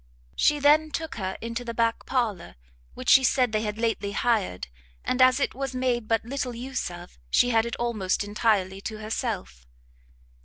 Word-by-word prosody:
She 295 - +3
then 300 +2 +4
took 310 -3 -5
her 190 -2 -3
into 230 +1 -4
the 235 -1 -6
back 230 0 0
parlour, 220 - -1 0.4
which - - -8
she 265 - +7
said 250 -1 +2
they 215 -1 0
had 210 -1 -3
lately 225 -3 -1
hired, 210 - 0 0.4
and, 255 - 0
as 255 +1 +6
it - - 0
was 270 -1 -4
made 245 -3 0
but 225 0 +1
little 250 -1 -3
use 255 -1 -4
of, 175 - -11
she 245 - +4
had 225 0 +3
it 235 - -4
almost 220 -6 -1
entirely 205 -2 0
to 215 +1 -5
herself. 215 - -4
230 Hz, 180 wpm, -26 LUFS, 210-255 Hz, 0.4 s, she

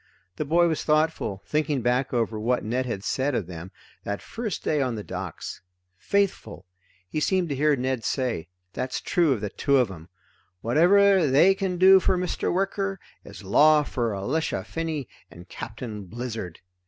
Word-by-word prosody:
The 150 - -2
boy 170 +4 +3
was 160 -2 -1
thoughtful, 155 -10 0
thinking 150 -4 -1
back 125 +2 +1
over 115 -3 -1
what 120 +3 0
Ned 125 +4 -1
had 100 -5 -4
said 135 +3 0
of 105 - -1
them, 85 +1 -8 0.3
that 100 0 -3
first 225 -5 -5
day 150 -2 +1
on 125 -3 -1
the 105 - -5
docks: 90 -4 -6 0.3
Faithful! 190 - -1 0.4
he 125 - -3
seemed 180 +2 +1
to 140 - -1
hear 150 +2 +3
Ned 130 -2 -2
say, 120 - -2 0.3
that's 130 0 -3
true 170 -4 +2
of 120 -6 0
the 105 -1 -3
two 140 0 +2
of 125 -6 +2
'em! 85 -1 -11 0.5
Whatever 185 - +4
they 150 +9 +5
can 190 -2 -2
do 190 +1 +8
for 185 0 +1
Mr. 180 0 -1
Wicker 195 +1 -1 0.2
is 100 +1 -11
law 150 +10 +5
for 120 -6 -2
Elisha 125 0 -2
Finney 155 +5 -4 0.2
and 85 +1 -13
Captain 110 -3 -7
Blizzard. 110 -4 -6
130 Hz, 170 wpm, -25 LUFS, 105-165 Hz, 0.5 s, do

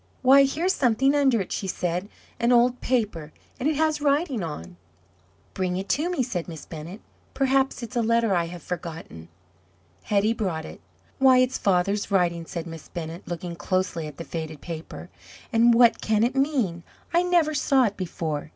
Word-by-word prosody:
"Why, 275 +2 +7
here's 335 +7 0
something 265 -1 +2
under 270 -6 +3
it," 185 - -6
she 195 - -3
said 180 +2 -2 0.3
"an 235 +1 +2
old 245 +1 +3
paper, 210 -11 -1 0.3
and 270 +4 +1
it 310 - 0
has 310 0 +1
writing 285 - +1
on." 85 - -7 0.8
"Bring 185 -1 -1
it 190 +1 -4
to 315 +5 +1
me," 350 -8 0
said 190 -9 -4
Miss 160 -3 -8
Bennett; 165 +6 -9 0.3
"perhaps 270 -1 +1
it's 235 +2 -7
a 240 - +2
letter 230 -2 +2
I 170 -1 +1
have 170 -1 -9
forgotten." 160 - -7 0.8
Hetty 210 +2 +2
brought 185 -8 -3
it. - - -11 0.4
"Why, 265 -1 +6
it's 255 0 +2
father's 195 +2 +1
writing!" 170 -4 +1
said 170 -1 -5
Miss 165 -2 -9
Bennett, 165 0 -7
looking 175 0 -5
closely 180 -3 -2
at 150 - -10
the 170 - -6
faded 160 -2 -6
paper; 165 +1 -8 0.4
"and 230 +1 +5
what 235 0 +5
can 215 0 +2
it 245 +3 +1
mean? 265 - 0 0.3
I 340 - +4
never 345 -4 +2
saw 275 -2 +3
it 205 -4 0
before. 160 -5 -4
210 Hz, 180 wpm, -25 LUFS, 170-260 Hz, 0.8 s, Why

